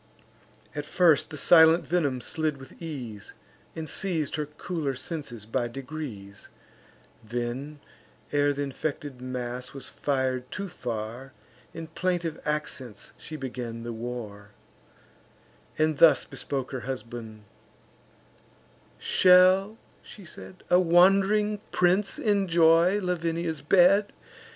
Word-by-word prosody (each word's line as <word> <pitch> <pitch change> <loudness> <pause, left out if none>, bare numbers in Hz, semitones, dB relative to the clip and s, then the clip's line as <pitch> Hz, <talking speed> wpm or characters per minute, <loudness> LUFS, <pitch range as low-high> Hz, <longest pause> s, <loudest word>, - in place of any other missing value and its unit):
At 145 0 -5
first 170 -5 +3
the 155 - -7
silent 160 +2 +6
venom 145 -8 0
slid 155 +3 -2
with 135 +4 -14
ease, 125 -11 -7 0.4
And 160 -1 -5
seiz'd 160 -5 -1
her 150 -2 -3
cooler 150 -2 -4
senses 130 - -6
by 120 +2 -1
degrees; 125 -7 -8 0.7
Then, 120 +6 -4 0.5
ere 145 0 +3
th' 140 - -6
infected 140 -1 -4
mass 125 0 -5
was 130 -1 -8
fir'd 130 -2 -2
too 195 0 -5
far, 120 -2 -6 0.4
In 165 0 -7
plaintive 170 -1 -2
accents 140 -7 -4
she 155 - -9
began 125 -4 -6
the 120 0 -5
war, 110 -3 -7 1.3
And 155 -1 +1
thus 165 - +6
bespoke 135 -2 -5
her 130 - -3
husband: 115 -4 -7 1.5
"Shall," 185 +3 +5 0.2
she 200 - -13
said, 185 +2 -12
"A 180 - +7
wand'ring 195 +4 +4
prince 185 +3 +2
enjoy 175 -2 +3
Lavinia's 170 -3 -2
bed? 195 +6 +4
150 Hz, 110 wpm, -27 LUFS, 125-175 Hz, 1.5 s, A